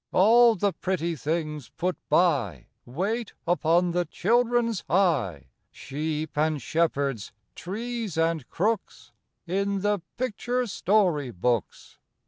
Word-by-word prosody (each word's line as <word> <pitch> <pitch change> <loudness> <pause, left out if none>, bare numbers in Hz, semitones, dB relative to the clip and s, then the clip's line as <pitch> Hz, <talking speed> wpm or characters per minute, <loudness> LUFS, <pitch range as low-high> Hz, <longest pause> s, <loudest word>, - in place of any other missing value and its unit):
All 230 +4 +6
the 200 0 0
pretty 170 -3 -2
things 150 -3 -3
put 175 +8 -2
by, 145 - +2 0.2
Wait 200 - -2
upon 175 +1 +2
the 175 +1 +1
children's 235 0 +1
eye, 145 - +1 0.3
Sheep 150 +2 -4
and 155 0 +1
shepherds, 140 -5 -1 0.2
trees 220 +3 -5
and 165 -4 0
crooks, 210 +3 -2 0.3
In 195 +2 -1
the 205 -1 +1 0.2
picture 250 +1 -1
story 185 - +1
books. 115 +2 -2
175 Hz, 110 wpm, -26 LUFS, 150-205 Hz, 0.3 s, All